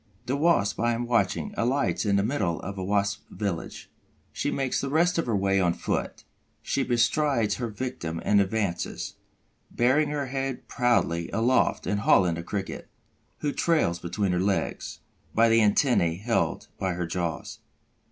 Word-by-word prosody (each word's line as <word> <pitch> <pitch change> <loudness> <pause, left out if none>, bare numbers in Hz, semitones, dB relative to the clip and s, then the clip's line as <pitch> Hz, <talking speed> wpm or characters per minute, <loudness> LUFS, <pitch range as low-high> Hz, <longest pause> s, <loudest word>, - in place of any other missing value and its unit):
The 130 +2 -1
Wasp 140 -10 +2
I 120 +1 +2
am 120 +1 -2
watching 120 - 0
alights 125 -2 0
in 100 - +3
the 100 - +2
middle 100 -8 -1
of 100 +1 -6
a 95 - -4
Wasp 100 0 0
village. 100 -6 -4 0.5
She - - -1
makes 135 -2 -1
the 140 - -3
rest 170 +4 +2
of 165 - -1
her 115 - +1
way 95 0 +2
on 90 -2 +2
foot. - - -3 0.4
She 140 - 0
bestrides 120 -3 +1
her 120 - -2
victim 105 -8 -4
and 100 -1 +5
advances, 100 -2 -2 0.5
bearing 140 +5 +2
her 145 -1 -2
head 135 0 -4
proudly 115 -9 +1
aloft 120 +4 +2
and 105 - 0
hauling 90 -4 +4
the 85 - -4
Cricket, 95 +3 -5 0.5
who 145 - 0
trails 150 - +1
between 90 +3 -1
her 90 - +1
legs, 95 +1 -2 0.3
by 115 +1 +5
the 115 0 +5
antennæ 105 - +3
held 115 +3 0
between 95 -2 -1
her 90 0 -2
jaws. 85 -2 -4
110 Hz, 160 wpm, -26 LUFS, 95-130 Hz, 0.5 s, and